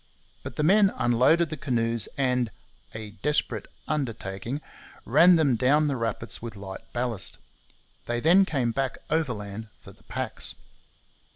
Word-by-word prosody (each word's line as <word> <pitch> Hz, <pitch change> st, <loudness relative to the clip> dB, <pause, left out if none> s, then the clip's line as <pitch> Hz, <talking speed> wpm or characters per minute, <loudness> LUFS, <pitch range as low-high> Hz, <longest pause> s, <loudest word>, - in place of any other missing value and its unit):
But -, -, -7 dB
the 150 Hz, -, 0 dB
men 195 Hz, +4 st, +5 dB
unloaded 130 Hz, +8 st, +3 dB
the 155 Hz, -, -3 dB
canoes 115 Hz, -5 st, 0 dB
and 125 Hz, -3 st, +1 dB, 0.5 s
'a 110 Hz, -1 st, -6 dB
desperate 150 Hz, 0 st, 0 dB, 0.2 s
undertaking' 120 Hz, -4 st, -3 dB, 0.5 s
ran 175 Hz, +1 st, +6 dB
them 145 Hz, -6 st, +3 dB
down 145 Hz, +6 st, +3 dB
the 140 Hz, -, 0 dB
rapids 115 Hz, -1 st, -2 dB
with 115 Hz, -2 st, -7 dB
light 95 Hz, -1 st, -7 dB
ballast. 120 Hz, -5 st, -2 dB, 0.7 s
They 120 Hz, 0 st, 0 dB
then 175 Hz, +9 st, +6 dB
came 135 Hz, -10 st, 0 dB
back 135 Hz, +2 st, -2 dB
overland 110 Hz, -9 st, -2 dB
for -, -, -13 dB
the -, -, -21 dB
packs. -, -, -4 dB
125 Hz, 135 wpm, -26 LUFS, 115-150 Hz, 0.7 s, ran